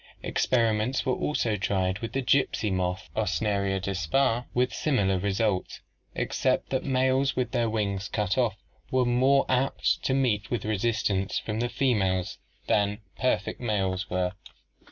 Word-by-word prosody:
Experiments 115 Hz, +1 st, +1 dB
were 130 Hz, -, +2 dB
also 120 Hz, -7 st, 0 dB
tried 95 Hz, -1 st, 0 dB
with 115 Hz, -, -5 dB
the 135 Hz, -, -1 dB
gypsy 120 Hz, -6 st, +2 dB
moth 90 Hz, 0 st, -2 dB
(Ocneria 100 Hz, -2 st, 0 dB
dispar) 100 Hz, -, 0 dB
with 125 Hz, +1 st, +1 dB
similar 100 Hz, -11 st, +1 dB
results 100 Hz, 0 st, -1 dB, 0.3 s
except -, -, 0 dB
that 130 Hz, -1 st, 0 dB
males 130 Hz, 0 st, +2 dB
with 125 Hz, -1 st, -1 dB
their 120 Hz, -3 st, +1 dB
wings 100 Hz, -3 st, -1 dB
cut 105 Hz, -2 st, -1 dB
off 120 Hz, -6 st, +1 dB, 0.3 s
were 130 Hz, -1 st, +2 dB
more 130 Hz, +3 st, +3 dB
apt 130 Hz, +2 st, +1 dB
to 130 Hz, -, +1 dB
meet 115 Hz, -6 st, +1 dB
with 120 Hz, -4 st, -2 dB
resistance 105 Hz, -2 st, 0 dB
from 110 Hz, 0 st, -3 dB
the 120 Hz, +1 st, 0 dB
females 95 Hz, -9 st, 0 dB, 0.3 s
than 100 Hz, -1 st, +1 dB, 0.2 s
perfect 125 Hz, -5 st, 0 dB
males 95 Hz, -4 st, -1 dB
were. 90 Hz, 0 st, 0 dB
110 Hz, 140 wpm, -27 LUFS, 95-125 Hz, 0.3 s, more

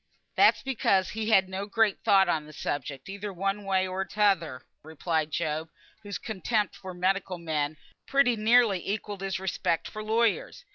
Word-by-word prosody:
"That's -, -, +5 dB
because 210 Hz, -8 st, +1 dB
he 220 Hz, 0 st, -3 dB
had 190 Hz, -4 st, +5 dB
no 190 Hz, +2 st, -5 dB
great 215 Hz, -1 st, +2 dB
thought 195 Hz, -1 st, +5 dB
on 155 Hz, -2 st, -1 dB
the 155 Hz, -, -12 dB
subject, 145 Hz, -2 st, -4 dB
either 200 Hz, +1 st, -5 dB
one 195 Hz, +2 st, -2 dB
way 190 Hz, -1 st, +2 dB
or 185 Hz, +1 st, -2 dB
t'other," 195 Hz, -11 st, 0 dB, 0.2 s
replied 160 Hz, 0 st, -2 dB
Job, 155 Hz, 0 st, -2 dB, 0.3 s
whose 205 Hz, -3 st, -5 dB
contempt 215 Hz, 0 st, -2 dB
for 185 Hz, -2 st, -9 dB
medical 185 Hz, 0 st, 0 dB
men 155 Hz, -2 st, -2 dB, 0.3 s
pretty 275 Hz, -3 st, +3 dB
nearly 220 Hz, -2 st, +4 dB
equalled 205 Hz, -1 st, -4 dB
his 195 Hz, -1 st, -2 dB
respect 175 Hz, -3 st, -1 dB
for 215 Hz, -, -7 dB
lawyers. 235 Hz, -, 0 dB
195 Hz, 160 wpm, -28 LUFS, 170-215 Hz, 0.3 s, That's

